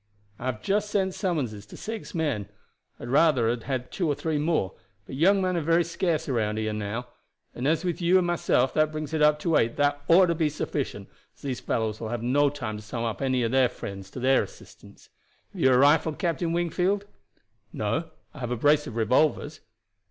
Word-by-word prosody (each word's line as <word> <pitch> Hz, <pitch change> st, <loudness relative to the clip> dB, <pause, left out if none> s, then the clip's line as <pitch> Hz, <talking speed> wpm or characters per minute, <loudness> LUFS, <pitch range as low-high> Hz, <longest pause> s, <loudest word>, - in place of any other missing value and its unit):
"I 125 Hz, -, -4 dB
have 110 Hz, -5 st, -3 dB
just 205 Hz, +1 st, 0 dB
sent 190 Hz, -2 st, 0 dB
summonses 130 Hz, -, -2 dB
to -, -, -11 dB
six 220 Hz, -3 st, -6 dB
men. 135 Hz, -12 st, -1 dB, 0.5 s
I -, -, -10 dB
would 120 Hz, -, -6 dB
rather 140 Hz, -4 st, +4 dB
have 120 Hz, -1 st, -3 dB
had 130 Hz, -2 st, -3 dB
two 175 Hz, -, -1 dB
or 145 Hz, -, +1 dB
three 150 Hz, +1 st, -1 dB
more, 150 Hz, -, 0 dB, 0.3 s
but -, -, -10 dB
young 190 Hz, +8 st, +3 dB
men 185 Hz, -1 st, 0 dB
are 170 Hz, -, 0 dB
very 165 Hz, +3 st, +3 dB
scarce 170 Hz, -1 st, -1 dB
around 110 Hz, -5 st, 0 dB
here 110 Hz, 0 st, -1 dB
now; 105 Hz, +3 st, -4 dB, 0.5 s
and 125 Hz, +3 st, -3 dB
as 160 Hz, +4 st, +1 dB
with 175 Hz, 0 st, -2 dB
you 175 Hz, +2 st, +4 dB
and 185 Hz, -, +2 dB
myself 165 Hz, -7 st, +1 dB
that 155 Hz, 0 st, +2 dB
brings 155 Hz, 0 st, -5 dB
it 155 Hz, -, 0 dB
up 150 Hz, 0 st, +5 dB
to 165 Hz, -1 st, +1 dB
eight 115 Hz, +1 st, +1 dB
that 145 Hz, 0 st, +1 dB
ought 180 Hz, +3 st, +7 dB
to 170 Hz, -, +1 dB
be 160 Hz, -2 st, +1 dB
sufficient, 150 Hz, -, -4 dB, 0.3 s
as -, -, -25 dB
these 130 Hz, -3 st, -3 dB
fellows 110 Hz, -1 st, -2 dB
will 110 Hz, -, -5 dB
have 120 Hz, -1 st, -3 dB
no 140 Hz, +4 st, +3 dB
time 120 Hz, -7 st, -5 dB
to 105 Hz, -, -10 dB
summon 115 Hz, 0 st, -3 dB
any 130 Hz, -2 st, +1 dB
of 115 Hz, -, 0 dB
their 130 Hz, -1 st, +4 dB
friends 100 Hz, -5 st, -8 dB
to 130 Hz, -, -8 dB
their 130 Hz, +1 st, +4 dB
assistance. -, -, -12 dB, 0.4 s
Have -, -, -6 dB
you 130 Hz, -, +5 dB
a 125 Hz, -, +5 dB
rifle, 150 Hz, +4 st, +4 dB
Captain 170 Hz, -1 st, -1 dB
Wingfield?" 180 Hz, +4 st, 0 dB, 0.7 s
"No; 140 Hz, +11 st, -2 dB, 0.2 s
I 150 Hz, -, -11 dB
have 125 Hz, -2 st, -4 dB
a 125 Hz, -, -2 dB
brace 145 Hz, +4 st, +3 dB
of 115 Hz, -, -7 dB
revolvers." 125 Hz, +7 st, +1 dB
145 Hz, 215 wpm, -26 LUFS, 120-165 Hz, 0.7 s, ought